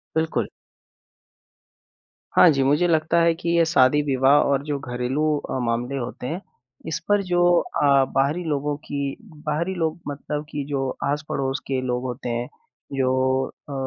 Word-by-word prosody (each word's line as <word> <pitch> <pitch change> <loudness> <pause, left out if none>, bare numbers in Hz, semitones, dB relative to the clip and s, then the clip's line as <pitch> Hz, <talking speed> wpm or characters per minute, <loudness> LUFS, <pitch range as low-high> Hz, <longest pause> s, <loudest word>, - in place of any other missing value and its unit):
बिल्कुल। 160 0 0 1.9
हाँ 180 - +8
जी, 135 -2 +1
मुझे 145 +6 +3
लगता 160 0 +2
है 165 0 +4
कि 170 0 -4
ये 170 - +5
शादी-विवाह 135 -2 +3 0.2
और 140 -1 +2
जो 145 -1 -1
घरेलू 125 +2 -2
अ, 145 - -4
मामले 120 +2 -1
होते 125 0 -5
हैं, 165 +7 -4 0.5
इस 160 - -2
पर 205 0 +4
जो 175 0 +2 0.2
अ, - - -2 0.3
बाहरी 145 +6 +1
लोगों 150 -2 -1
की 145 - -4 0.5
बाहरी 170 +5 0
लोग 165 -1 -1
मतलब 150 +1 -4
कि 145 -2 -3
जो 135 -2 -1
आस-पड़ोस 140 -2 -1
के 135 -1 0
लोग 125 0 -1
होते 125 0 -4
हैं, 120 +1 -2 0.5
जो 130 0 +1 0.2
अ, 140 - -5
140 Hz, 150 wpm, -23 LUFS, 130-160 Hz, 1.9 s, हाँ